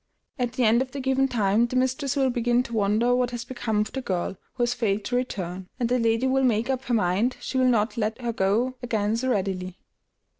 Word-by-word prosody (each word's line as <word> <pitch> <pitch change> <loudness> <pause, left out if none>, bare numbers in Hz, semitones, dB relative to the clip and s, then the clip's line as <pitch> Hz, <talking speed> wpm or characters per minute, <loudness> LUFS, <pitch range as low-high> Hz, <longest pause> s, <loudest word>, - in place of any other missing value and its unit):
At 245 -1 -1
the 255 -1 0
end 230 +2 +4
of 260 - -2
the 280 - -4
given 265 0 +2
time 225 -2 +2
the 250 - -5
mistress 260 +2 0
will 265 -2 +2
begin 240 0 +1
to 235 - -9
wonder 220 +3 +2
what 250 -1 +1
has 240 -1 -5
become 230 -4 -1
of 210 - -3
the 265 - -4
girl, 185 -5 -2 0.2
who 245 - 0
has 240 0 +1
failed 215 -4 -1
to 245 - -2
return; 190 -7 -3
and 240 -2 0
the 250 0 +2
lady 230 +2 +2
will 265 +1 +2
make 235 0 +2
up 265 0 -3
her 245 - -1
mind 210 +5 +1
she 260 - -2
will 255 - +4
not 215 -2 +1
let 220 +1 -1
her 240 -2 -2
go 220 +6 +1
again 220 -3 0
so 260 +3 -1
readily. 185 -4 -2
240 Hz, 235 wpm, -25 LUFS, 210-255 Hz, 0.2 s, end